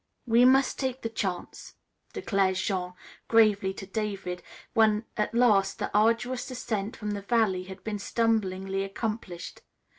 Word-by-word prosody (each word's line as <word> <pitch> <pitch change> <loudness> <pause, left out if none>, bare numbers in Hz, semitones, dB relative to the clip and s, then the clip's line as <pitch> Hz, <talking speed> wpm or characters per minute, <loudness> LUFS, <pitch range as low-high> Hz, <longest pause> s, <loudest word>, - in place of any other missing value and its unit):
"We 235 +1 +5
mus' 265 +1 +5
tak' 260 -1 -3
the 230 - -1
chance," 190 -5 -4 0.4
declared 195 -2 +1
Jean 185 -2 -2 0.3
gravely 210 -4 +4
to 195 - -7
David, 195 -3 -4 0.3
when 220 0 +3
at 210 +1 -1
last 205 -5 +4
the - - -4
arduous 230 +4 +2
ascent 225 -4 -3
from 210 -1 -4
the 205 -1 -3
valley 200 -4 +1
had 190 0 -10
been 210 -2 -3
stumblingly 195 -4 0
accomplished. 195 -3 -5
210 Hz, 140 wpm, -28 LUFS, 195-230 Hz, 0.4 s, We